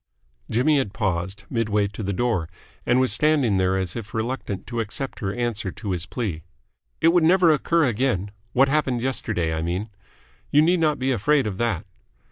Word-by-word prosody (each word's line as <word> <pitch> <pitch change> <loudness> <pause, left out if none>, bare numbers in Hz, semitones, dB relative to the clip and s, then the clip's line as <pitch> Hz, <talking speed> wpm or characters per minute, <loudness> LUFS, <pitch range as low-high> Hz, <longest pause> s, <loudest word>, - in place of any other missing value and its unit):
Jimmy 140 +6 +3
had 105 -7 -2
paused, 95 -1 -2
mid 115 0 -1
way 105 -1 +2
to 105 - -8
the 100 -1 -2
door, 100 -6 0 0.4
and 120 +1 +4
was 130 -4 +3
standing 140 -6 +2
there 95 0 +2
as 95 -3 -3
if 115 -2 -7
reluctant 110 -4 -3
to 120 0 -4
accept 115 +5 -4
her 100 -5 -2
answer 115 -4 -2
to 105 -4 -5
his 85 -2 -2
plea. 95 -10 -3 0.6
"It 165 - +6
would 175 0 +4
never 175 0 +5
occur 165 +2 +2
again. 110 -5 0 0.2
What 135 +2 +5
happened 135 -4 0
yesterday, 105 -10 -1
I 80 - -2
mean. 90 +6 -3 0.6
You 150 +1 +5
need 175 +2 +3
not 155 -2 +2
be 130 +1 0
afraid 135 +5 +2
of 100 -3 -4
that." 115 -7 -1
115 Hz, 190 wpm, -24 LUFS, 95-135 Hz, 0.6 s, It